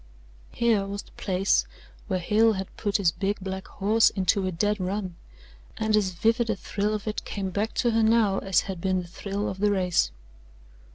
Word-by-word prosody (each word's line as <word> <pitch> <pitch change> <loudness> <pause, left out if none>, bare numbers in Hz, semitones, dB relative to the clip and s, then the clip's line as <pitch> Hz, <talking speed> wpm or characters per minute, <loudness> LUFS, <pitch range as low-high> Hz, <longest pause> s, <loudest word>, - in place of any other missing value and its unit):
Here 225 -4 +1
was 200 0 -5
the - - -21
place 190 0 +1 0.4
where 190 -4 0
Hale 215 +5 +3
had 190 -1 -6
put 205 -1 0
his 190 -5 +3
big 195 +4 -2
black 190 0 -5
horse 215 +3 +3
into 190 0 +1
a - - -1
dead 205 +5 0
run, 185 -1 -3 0.6
and 220 -1 +1
as 205 -3 +2
vivid 225 +6 +1
a 220 - +1
thrill 205 +2 -2
of 210 +1 -6
it 215 - -3
came 195 -2 -4
back 205 +4 -2
to 240 - +2
her 225 0 +2
now 220 -3 +3
as 195 -2 +2
had 190 -3 -6
been 185 -1 0
the - - -11
thrill 200 +3 -4
of 190 - -5
the 210 +1 +3
race. 180 - +2
200 Hz, 195 wpm, -26 LUFS, 190-215 Hz, 0.6 s, Hale